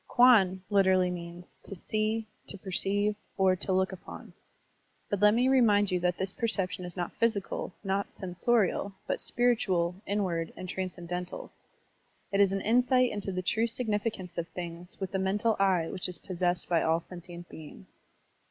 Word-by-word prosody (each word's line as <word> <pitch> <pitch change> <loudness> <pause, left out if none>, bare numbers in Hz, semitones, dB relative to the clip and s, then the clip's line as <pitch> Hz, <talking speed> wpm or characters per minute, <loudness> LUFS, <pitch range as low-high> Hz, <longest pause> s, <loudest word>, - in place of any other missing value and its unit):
Kwan 200 -7 +5
literally 190 -2 +4
means 175 0 -9
"to 195 - -7
see," 215 +4 -1 0.2
"to 200 - -6
perceive," 200 +2 0 0.2
or 190 -1 +4
"to 190 - -3
look 190 0 +2
upon." 190 - -10 0.8
But 205 - 0
let 210 +1 +6
me 245 +2 +3
remind 210 -7 +4
you 180 - +1
that 180 0 0
this 190 0 -2
perception 190 -5 -2
is 175 +1 -9
not 175 -1 -3
physical, 215 -4 0
not 195 0 -1
sensorial, 200 +1 0
but - - -2
spiritual, 195 -8 +1
inward, 180 -5 -1
and 185 - -6
tran 185 0 -3
scendental. 180 0 -6 0.8
It 200 - +1
is 195 -1 +5
an 195 0 -1
insight 250 +3 +3
into 205 -2 -3
the 185 0 -3
true 225 +5 +1
signifi 225 -2 -1
cance 180 -4 -7
of 170 - -3
things 175 0 -7
with 190 -2 -4
the 190 - -1
mental 210 +4 +1
eye 185 -4 +3
which 185 -1 -3
is 180 - +1
possessed 180 -1 -1
by 170 -2 +2
all 165 +1 +2
sentient 175 0 -10
beings. 150 - -11
190 Hz, 170 wpm, -29 LUFS, 180-210 Hz, 0.8 s, let